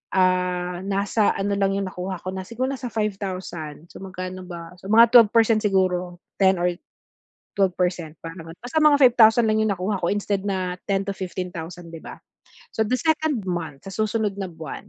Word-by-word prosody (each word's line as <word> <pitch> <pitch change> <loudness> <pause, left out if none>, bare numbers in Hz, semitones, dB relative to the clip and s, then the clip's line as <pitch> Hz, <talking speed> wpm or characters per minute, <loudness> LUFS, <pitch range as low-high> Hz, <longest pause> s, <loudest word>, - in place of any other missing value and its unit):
ah, 180 -1 +1
nasa 200 +2 +1
ano 200 +1 -1
lang 195 -1 +1
'yong 195 -1 -2
nakuha 185 +1 -4
ko 185 - -4
na 190 - -4
siguro 255 +5 -2
nasa 255 -2 -5
5,000, 185 -7 -4
so, - - -11
magkano 185 -1 -6
ba, 170 0 -8
so 190 - -9
mga 230 +1 +7
12% 225 -1 +6
siguro, 185 -3 +1 0.2
10 190 -1 +5
or 175 0 +1 0.9
12% 180 -4 0
parang 165 0 -8
gan 170 - -16
basta 255 +6 -1
mga 300 -1 +6
5,000 235 -2 +6
lang 215 0 +2
'yong 215 - +2
nakuha 190 +3 -2
ko 170 - +1
instead 200 -1 -1
na 185 -2 -2
10,000-15,000 180 -3 -4
'di 165 - -7
ba? - - -10 0.6
So, 220 - +2
the 255 - +1
2nd 315 - 0
month 165 -3 -4
sa 195 - -7
susunod 215 -1 0
na 190 - -3
buwan, 160 +4 -8
190 Hz, 175 wpm, -23 LUFS, 180-215 Hz, 0.9 s, mga